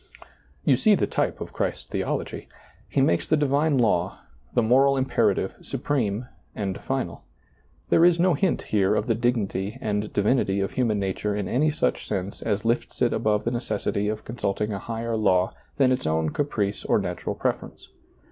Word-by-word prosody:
You 130 - +5
see 210 - +5
the - - +1
type - - -1
of - - -6
Christ's - - -2
theology. - - -3 0.4
He - - +1
makes 85 - +2
the 155 - +4
divine 145 +1 +2
law, 95 -6 +1 0.3
the 120 - +4
moral 135 +4 +4
imperative, 130 0 +1
supreme, 120 -5 -2 0.3
and 100 -2 -3
final. 130 -12 -3 0.7
There 165 - +5
is 175 -1 +5
no 180 0 +4
hint 170 +4 0
here 100 -1 +2
of - - 0
the 115 - +2
dignity 110 -3 -1
and 105 -3 -2
divinity 100 -2 +1
of 95 - -1
human 115 -5 +1
nature 100 +1 -1
in 100 -2 -2
any 145 +9 +2
such 150 - -1
sense 100 -1 -3
as 105 -1 -1
lifts 115 +1 -1
it 120 - +2
above 105 -2 +1
the 120 - -1
necessity 110 -4 -1
of 105 0 -4
consulting 105 -2 -2
a 100 - -3
higher 115 +2 -3
law 95 -4 +2 0.2
than 130 -2 +4
its 125 -10 0
own 80 0 +1
caprice 105 -9 -1
or - - +2
natural - - -3
preference. - - -3
110 Hz, 175 wpm, -25 LUFS, 100-130 Hz, 0.7 s, You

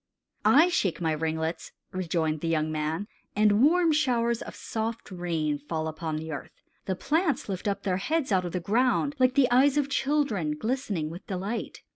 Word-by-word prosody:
"I 320 +6 +6
shake 200 - 0
my 165 -2 0
ringlets," 160 +1 -2 0.2
rejoined 165 -4 -1
the 165 - -2
young 155 -1 +1
man, 155 +5 -2 0.3
"and 210 0 +4
warm 335 +4 +5
showers 240 -6 +1
of - - -8
soft 225 0 -4
rain 165 -5 -1
fall 155 +2 -3
upon 160 0 -4
the 160 +1 -5
earth. 145 - -8 0.3
The 190 - -1
plants 310 - 0
lift 190 -1 -4
up 200 0 -1
their 185 -2 0
heads 300 +5 -1
out 185 -2 +3
of 175 - -4
the 180 - -1
ground 250 +9 +1
like 255 0 +3
the 270 -4 +4
eyes 270 +3 +5
of 285 -1 +1
children 265 - 0
glistening 210 - -2
with 175 +3 -10
delight. 200 +5 -4
195 Hz, 180 wpm, -27 LUFS, 160-255 Hz, 0.3 s, I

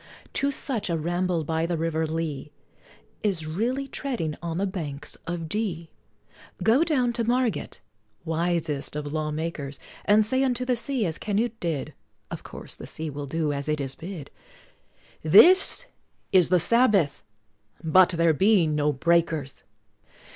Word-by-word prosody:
To 280 - +1
such, 250 -7 -3
a 170 - +1
ramble 175 +1 0
by 160 +2 -1
the 170 -1 -1
River 160 0 -1
Lea 155 -2 -3 0.7
Is 185 -7 -1
really 235 - -1
treading 240 - -3
on 170 -1 -3
the 195 - +1
"Banks 150 -6 -5
of 170 -1 -3
D 170 -4 -3 0.3
." - - -14
Go 240 +8 +5
down 260 -8 +1
to 235 0 -1
Margate, 240 - -1 0.4
wisest 160 -4 -1
of 145 -1 -4
law 155 -1 -1
makers, 150 -3 -4 0.3
And 210 +1 +5
say 260 +5 +1
unto 250 -1 0
the 250 -1 +2
sea, 240 -1 -1
as 160 -2 -3
Canute 225 +2 -1
did, 165 -5 -3 0.4
(Of - - -5
course - - -7
the - - -9
sea 160 -1 -5
will 145 0 -6
do 155 0 -1
as 140 +1 -4
it 150 0 0
is 135 -2 -3
bid,) 165 -4 -8 0.9
"This 365 - +6 0.5
is 185 -4 +5
the 180 0 +4
Sabbath 200 - +3 0.6
but 180 +3 +6
there 170 -2 +3
be 195 +2 +4
no 150 -1 +1
Breakers!" 160 -1 0
170 Hz, 155 wpm, -26 LUFS, 155-220 Hz, 0.9 s, This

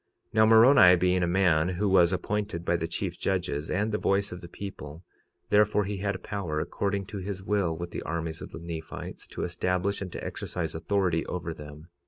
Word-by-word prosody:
46:34 - - -40
Now, 110 0 +5
Moroni 115 -4 +8
being 90 +1 +2
a 85 - +1
man 85 -2 +3
who 95 +3 -1
was 90 -3 +5
appointed 100 -1 -2
by 85 - +2
the 85 -1 -2
chief 85 +1 -4
judges 90 -6 -1
and 105 +4 0
the 105 - -1
voice 100 +1 +1
of 90 0 -7
the 85 - -9
people, 85 -4 -8 0.5
therefore 105 0 +4
he 100 0 -3
had 100 -1 -3
power 90 -7 -3
according 100 +4 -2
to 100 +1 -6
his 95 0 -5
will 95 -5 0
with 85 0 -6
the - - -4
armies 80 0 -4
of - - -7
the - - -9
Nephites, 80 -1 -7
to - - -5
establish 90 +3 -1
and 95 -2 -5
to - - -6
exercise 80 -3 -4
authority 90 0 0
over 85 -2 -4
them. 75 +1 -11
90 Hz, 205 wpm, -28 LUFS, 85-100 Hz, 0.5 s, Moroni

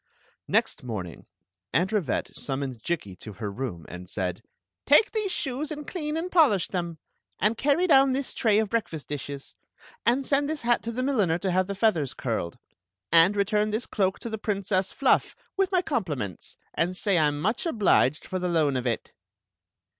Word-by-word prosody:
Next - - +1
morning 95 -9 -6 0.5
Aunt 180 +4 +2
Rivette 195 - -1
summoned 135 -4 -4
Jikki 130 - -3
to 110 - -9
her 105 0 -5
room, 100 -8 -5
and 90 0 -9
said: 90 -2 -2 0.5
"Take 295 +10 +6
these 425 -3 -1
shoes 285 -2 -2
and 300 -1 -6
clean 305 -3 -3
and 355 +3 -3
polish 265 - +4
them; 170 -3 -3 0.4
and 210 +3 +2
carry 290 +9 +2
down 270 -5 +6
this 270 +1 -2
tray 215 -3 +3
of 220 0 +2
breakfast 175 -10 -2
dishes; 140 -1 -6 0.5
and 260 +3 +2
send 285 +1 +2
this 310 -4 -3
hat 240 0 +2
to 230 - -4
the 250 +2 -2
milliner 210 -12 +2
to 185 +1 -1
have 185 +1 +2
the 200 - -3
feathers 190 - +1
curied; 110 -9 -3 0.5
and 170 +4 +6
return 210 +1 +1
this 215 +3 -1
cloak 190 -2 0
to 235 - -5
riie 220 -1 -4
Princess 195 -2 0
Fluff, 275 - +2 0.2
with 390 -1 +1
my 365 -1 +2
com 255 - 0
pliments, 125 - -6 0.2
and 180 +2 0
say 195 -5 +2
I 155 - +4
m 145 0 -2
much 220 - 0
obliged 195 - +2
for 185 - -3
the 180 0 -1
loan 155 -5 +2
of 125 -1 -1
it." 115 - -3
195 Hz, 185 wpm, -26 LUFS, -, 0.5 s, Take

